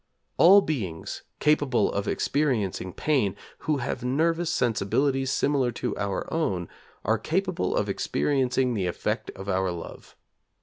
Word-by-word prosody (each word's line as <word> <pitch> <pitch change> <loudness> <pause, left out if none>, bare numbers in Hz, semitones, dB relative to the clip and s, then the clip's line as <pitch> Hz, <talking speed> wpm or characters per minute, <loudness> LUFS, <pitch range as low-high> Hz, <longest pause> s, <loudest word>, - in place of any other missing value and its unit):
All 195 +4 +8
beings 100 - -4 0.2
capable 145 -4 +2
of 100 - -2
experiencing 110 -11 0
pain, 130 - +1 0.2
who 155 -2 0
have 120 -1 -3
nervous 165 +6 +1
sensibilities 130 - +1
similar 135 -2 +1
to - - -3
our 100 -2 -2
own, 95 - 0 0.4
are 110 +2 +2
capable 175 - -1
of - - +1
experiencing 130 -2 0
the 95 -5 -1
effect 90 - -2
of 95 +1 -8
our 95 -1 +1
love. 85 -1 -9
125 Hz, 130 wpm, -26 LUFS, 100-150 Hz, 0.4 s, All